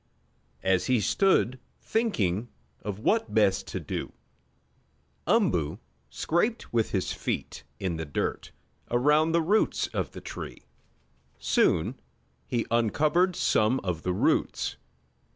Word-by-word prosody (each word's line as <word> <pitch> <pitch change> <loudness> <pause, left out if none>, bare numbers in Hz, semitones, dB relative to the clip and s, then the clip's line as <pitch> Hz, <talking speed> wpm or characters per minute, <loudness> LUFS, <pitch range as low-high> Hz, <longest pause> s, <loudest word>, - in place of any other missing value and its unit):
As 95 -1 +2
he 125 -2 +3
stood 130 - +2 0.2
thinking 115 - 0 0.3
of 100 -2 -4
what 220 - 0
best 100 -3 +3
to - - -4
do, - - -5 1.1
Umboo 80 -3 +2 0.3
scraped 170 - -1
with 115 -2 +2
his 95 -3 -1
feet - - -4 0.2
in 90 -4 -2
the 80 - -4
dirt 70 - -3 0.4
around 150 +6 +3
the 165 0 +3
roots 205 +7 +2
of - - -3
the - - -7
tree. - - -8 0.7
Soon - - +2 0.5
he 120 -2 -1
uncovered 155 - +2
some 110 -1 +2
of 90 -4 -2
the 90 - -1
roots. 90 - +1
115 Hz, 115 wpm, -28 LUFS, -, 1.1 s, he